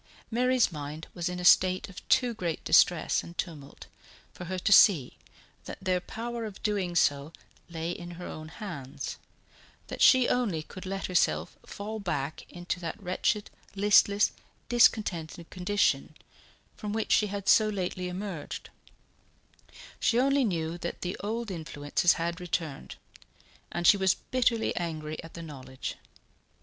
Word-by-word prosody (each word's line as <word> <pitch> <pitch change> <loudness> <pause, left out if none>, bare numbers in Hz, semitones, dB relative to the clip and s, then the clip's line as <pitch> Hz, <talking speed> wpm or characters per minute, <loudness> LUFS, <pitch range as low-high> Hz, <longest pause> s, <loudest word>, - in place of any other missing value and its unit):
Mary's 250 -1 +3
mind 150 +1 -6
was 175 0 -2
in 180 0 -4
a 180 - -4
state 185 +1 +5
of 195 - -12
too 250 -2 +3
great 175 -7 -3
distress 175 -2 +4
and 170 - -12
tumult 150 -6 -6 0.5
for 180 - -8
her 185 +2 -3
to 185 - 0
see 175 - +6 0.5
that - - -7
their 185 -1 0
power 235 +4 -5
of 205 -3 -9
doing 195 -5 -1
so 145 -2 +2 0.4
lay 165 0 -3
in 175 0 -7
her 180 - -7
own 155 0 -7
hands, 160 - -7 0.7
that - - -6
she 255 -2 +7
only 205 -11 0
could 185 +3 -10
let 195 0 -3
herself 80 - +1
fall 215 +2 -6
back 155 -6 -3
into 175 +1 -4
that 170 -2 -5
wretched, 200 +3 -1 0.2
listless, 205 0 +4 0.4
discontented 180 -9 +2
condition 185 +3 0 0.6
from 210 -1 -5
which 220 0 -2
she 210 - +4
had 200 -1 -5
so 215 -1 +6
lately 185 -2 -3
emerged; 180 -4 -6 1.3
she 235 - +2
only 275 +1 +3
knew 170 -5 -2
that 170 - -5
the 180 +1 -3
old 220 +2 -3
influences 160 -1 +1
had 170 +2 -3
returned, 165 -5 -4 0.8
and 175 0 -3
she 200 - +7
was 190 -1 +3
bitterly 240 -3 0
angry 155 -3 -4
at 165 - -12
the 170 - -7
knowledge. 130 -4 -7
180 Hz, 145 wpm, -29 LUFS, 165-210 Hz, 1.3 s, she